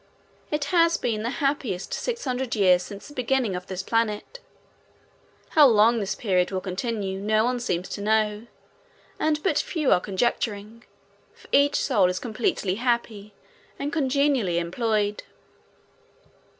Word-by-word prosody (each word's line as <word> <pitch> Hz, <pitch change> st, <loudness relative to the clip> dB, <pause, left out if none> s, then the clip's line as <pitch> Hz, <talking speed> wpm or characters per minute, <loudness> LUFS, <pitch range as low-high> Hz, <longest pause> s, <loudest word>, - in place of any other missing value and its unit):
It 300 Hz, -1 st, -1 dB
has 335 Hz, -1 st, +4 dB
been 220 Hz, -3 st, -2 dB
the 230 Hz, -, -2 dB, 0.2 s
happiest 245 Hz, -10 st, -2 dB
six 475 Hz, -6 st, -3 dB
hundred 255 Hz, -1 st, -2 dB
years 185 Hz, -4 st, +4 dB
since 200 Hz, +1 st, -9 dB
the 290 Hz, -, -12 dB
beginning 250 Hz, -5 st, 0 dB
of 180 Hz, 0 st, -6 dB
this 190 Hz, 0 st, -5 dB
planet. 225 Hz, -, -1 dB, 1.1 s
How 300 Hz, -3 st, +7 dB
long 230 Hz, 0 st, +4 dB
this 200 Hz, -2 st, -2 dB
period 180 Hz, -5 st, +1 dB
will 190 Hz, -, -2 dB
continue 195 Hz, 0 st, -3 dB
no 215 Hz, +2 st, +2 dB
one 250 Hz, 0 st, 0 dB
seems 180 Hz, -7 st, -2 dB
to -, -, -5 dB
know, 215 Hz, +1 st, 0 dB, 0.7 s
and 305 Hz, -1 st, 0 dB
but 385 Hz, -, +2 dB
few 310 Hz, -6 st, -1 dB
are -, -, +5 dB
conjecturing, 215 Hz, +2 st, -2 dB, 0.5 s
for -, -, -19 dB
each 285 Hz, +1 st, +4 dB
soul 205 Hz, -9 st, +2 dB
is 180 Hz, -, -2 dB
completely 215 Hz, -4 st, -1 dB
happy 225 Hz, -4 st, -2 dB, 0.4 s
and 290 Hz, +3 st, -4 dB
congenially 275 Hz, -, +1 dB
employed. 210 Hz, +4 st, -1 dB
220 Hz, 140 wpm, -25 LUFS, 200-260 Hz, 1.1 s, How